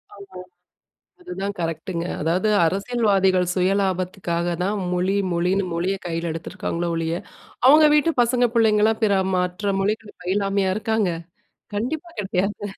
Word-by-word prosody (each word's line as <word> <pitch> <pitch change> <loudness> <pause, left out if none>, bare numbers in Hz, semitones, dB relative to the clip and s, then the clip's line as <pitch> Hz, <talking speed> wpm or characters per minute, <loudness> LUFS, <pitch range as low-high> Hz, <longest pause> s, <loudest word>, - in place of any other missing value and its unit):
ஆமா. 200 -2 -12 0.8
அதுதான் 200 - -5
கரெக்ட்ங்க. 165 +1 -3 0.2
அதாவது 175 +7 +1 0.2
அரசியல்வாதிகள் 195 -1 +2
சுயலாபத்துக்காக 185 -2 0
தான் 200 +3 0 0.2
மொழி 185 +2 +1 0.2
மொழின்னு, 180 +3 +1
மொழிய 180 +3 0
கையில 165 0 -2
எடுத்திருக்காங்களே 170 +1 -4
ஒழிய, 165 +1 -1 0.5
அவங்க 305 +3 +8
வீட்டு 315 +2 +3
பசங்க 245 +1 +2
பிள்ளைங்கலாம் 220 0 +3
பிற 200 -2 +3 0.2
மாற்ற 180 +3 -1
மொழிகள் 215 +2 -3
பயிலாமையா 195 +1 0
இருக்காங்க? 220 -3 0 0.7
கண்டிப்பா 295 - -3
கிடையாது. 195 +1 -2
195 Hz, 115 wpm, -22 LUFS, 180-215 Hz, 0.8 s, அவங்க